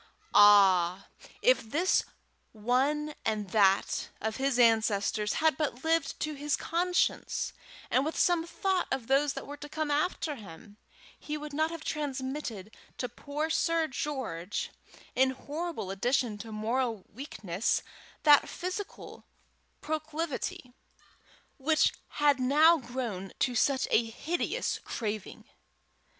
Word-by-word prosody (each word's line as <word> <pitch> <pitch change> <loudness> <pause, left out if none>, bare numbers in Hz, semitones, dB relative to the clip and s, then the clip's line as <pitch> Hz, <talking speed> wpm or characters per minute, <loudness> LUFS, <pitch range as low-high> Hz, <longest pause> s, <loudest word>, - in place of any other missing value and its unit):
Ah! 195 -3 +6 0.3
if - - +5
this 320 +12 +1 0.5
one 270 +7 0
and 210 -3 -2
that 195 -2 +3
of 220 0 -3
his 270 -1 0
ancestors 215 -3 +3
had 315 -3 +2
but 265 -5 -2
lived 325 -2 +1
to 305 - -1
his 295 0 -1
conscience, 355 +1 0 0.4
and 260 - +3
with 315 +2 -3
some 345 -2 +2
thought 380 +1 0
of 265 -3 -1
those 275 +3 +2
that - - -6
were 290 +1 -8
to 295 +1 -9
come 310 0 -2
after 305 +1 0
him, 205 0 -12 0.4
he 300 0 -4
would 300 -1 -8
not 315 +2 +1
have 330 -1 -7
transmitted 260 -7 -4 0.2
to 250 - -2
poor 295 +6 -4
Sir 330 0 +2
George, 250 - -4 0.4
in 260 +1 +4
horrible 290 - -5
addition 230 +1 0
to 225 +1 -8
moral 225 0 -1
weakness, 205 - -2 0.4
that 295 -2 +6
physical 370 +3 -6 0.6
proclivity 310 -4 -4 0.9
which 310 +3 +3 0.2
had 290 -2 +3
now 300 +6 +5
grown 235 -8 -5
to 250 - +1
such 265 +3 +2
a 235 - +5
hideous 270 +10 -2
craving. 215 -3 -5
270 Hz, 125 wpm, -30 LUFS, 220-310 Hz, 0.9 s, Ah